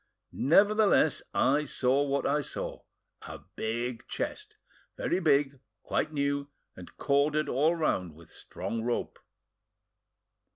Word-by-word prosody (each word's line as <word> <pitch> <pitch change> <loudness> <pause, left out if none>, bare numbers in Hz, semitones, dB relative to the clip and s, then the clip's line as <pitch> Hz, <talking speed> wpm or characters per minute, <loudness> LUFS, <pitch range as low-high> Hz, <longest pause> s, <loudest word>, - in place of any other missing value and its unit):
Nevertheless, 200 0 +4
I 145 +3 +2
saw 130 0 +1
what 140 -1 -1
I 150 +1 +2
saw. - - -5 0.4
A - - -9
big 115 +1 -3
chest, - - -5 0.4
very 180 - 0
big, 140 -5 +2 0.2
quite - - -1
new, 140 -1 -1 0.3
and 90 - -13
corded 145 +2 +1
all 155 +6 +2
round 90 - -1
with 85 0 -16
strong 115 - -5
rope." 120 +1 -3
140 Hz, 115 wpm, -29 LUFS, 125-150 Hz, 0.4 s, Nevertheless